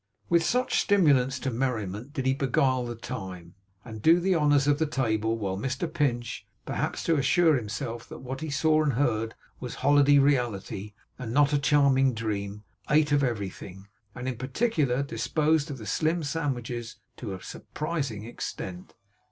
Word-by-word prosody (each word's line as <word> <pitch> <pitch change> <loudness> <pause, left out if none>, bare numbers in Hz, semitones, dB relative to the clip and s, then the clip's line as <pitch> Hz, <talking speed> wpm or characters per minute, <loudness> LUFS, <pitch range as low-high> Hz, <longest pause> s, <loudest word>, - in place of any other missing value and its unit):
With 170 -1 +4
such 250 +7 +1
stimulants 140 -10 +3
to 135 - -3
merriment 115 -1 -2
did 135 -2 -3
he 130 - +3
beguile 130 -1 +1
the 120 - -5
time, 95 -8 -7 0.3
and 110 -3 -8
do 165 +8 +6
the 190 +2 +2
honours 145 -3 +3
of 145 0 +2
the 160 - +1
table; 115 -4 0
while 95 -3 -3
Mr 130 - -2
Pinch, 125 -7 -1 0.2
perhaps - - -2
to 165 -2 +2
assure 160 +3 +4
himself 115 0 -4
that - - -8
what 130 +1 -6
he 160 - -4
saw 155 +2 +3
and 150 -3 +1
heard 115 -4 0 0.2
was 125 - -6
holiday 145 0 +6
reality, 110 -7 0 0.2
and 120 -3 -5
not 145 +3 +3
a 145 - +3
charming 135 -3 +3
dream, 105 -2 -3 0.3
ate 150 0 +3
of 145 -1 +3
everything, 100 -4 -4 0.3
and 125 +1 -5
in 130 -3 -3
particular 140 - 0
disposed 145 +6 0
of 140 - -5
the 110 - -9
slim 160 +7 0
sandwiches 125 -6 -3 0.2
to 105 -6 -5
a 95 - -11
surprising 145 -9 -4
extent. 95 -5 -7
130 Hz, 165 wpm, -27 LUFS, 115-145 Hz, 0.3 s, do